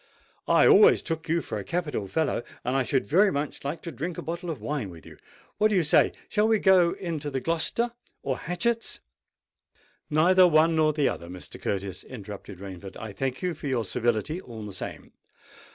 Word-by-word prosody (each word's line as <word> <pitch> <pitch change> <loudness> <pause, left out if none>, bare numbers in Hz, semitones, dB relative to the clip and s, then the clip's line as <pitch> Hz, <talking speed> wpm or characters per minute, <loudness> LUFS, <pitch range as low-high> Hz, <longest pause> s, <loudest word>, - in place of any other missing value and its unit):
"I - - +5
always 430 +1 +7
took 160 -2 -4
you 165 0 +1
for 105 - -4
a - - -5
capital 150 - -2
fellow—and 125 0 -2
I 135 - +3
should 130 +1 0
very 195 +6 +4
much 145 -1 -3
like 145 +4 -4
to 170 - -5
drink 165 +4 -5
a - - -5
bottle 170 +2 -4
of 160 - -4
wine 145 -9 -3
with 85 -3 -12
you. - - -13 0.4
What 215 - +5
do 215 - 0
you 180 - +3
say? 150 - +4 0.2
Shall 210 0 +2
we 220 -1 +4
go 185 -4 +5
into 160 -5 -4
the 135 -2 -2
Gloucester, 165 - 0 0.3
or 135 -2 -2
Hatchett's——" 230 +7 -2 1.1
"Neither 180 +4 +5
one 160 0 +4
nor 155 -1 +4
the 145 -2 +1
other, 85 - -3
Mr. 90 +1 -9
Curtis," 100 -1 -3
interrupted 105 -4 -9
Rainford. 95 0 -9
"I 110 -2 -7
thank 130 - -3
you 180 -1 0
for 150 -1 -7
your 125 -4 0
civility 120 - -1
all 115 - -9
the 100 - -7
same." 95 - -7
150 Hz, 195 wpm, -27 LUFS, 115-175 Hz, 1.1 s, always